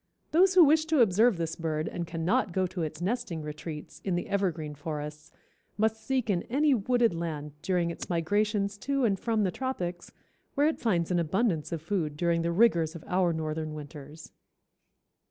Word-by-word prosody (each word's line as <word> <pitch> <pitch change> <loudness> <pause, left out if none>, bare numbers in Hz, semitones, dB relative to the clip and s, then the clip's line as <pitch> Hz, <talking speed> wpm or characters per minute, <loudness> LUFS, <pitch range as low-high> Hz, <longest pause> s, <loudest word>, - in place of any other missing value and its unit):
Those 370 +4 +4
who 360 - +9
wish 315 +1 +4
to 315 -4 +3
observe 220 0 +4
this 165 -1 -2
bird 155 -2 -2
and 170 -1 -4
cannot 175 +6 0
go 185 +1 +1
to 180 0 -4
its 155 0 -4
nesting 180 -6 -2
retreats, 150 0 -7
in 190 -3 0
the 175 - -3
evergreen 175 -7 -1
forests, 150 +1 -6 0.5
must 220 +1 0
seek 260 0 0
in 185 -5 +1
any 290 +4 +3
wooded 240 -1 +2
land 155 -3 -4
during 175 -3 0
its - - -7
migrations 200 +4 0
to 275 0 0
and 195 -4 +1
from 225 -2 0
the 185 - +1
tropics, 180 -9 -4 0.4
where 285 - +3
it 315 - -1
finds 180 -8 0
an 175 - +2
abundance 170 -1 0
of 165 -2 -4
food 165 -5 -2
during 170 0 +1
the 170 +1 0
rigors 170 -5 +3
of 165 - -8
our 180 -1 +2
northern 155 -1 -3
winters. 150 +1 -10
175 Hz, 180 wpm, -29 LUFS, 160-220 Hz, 0.5 s, who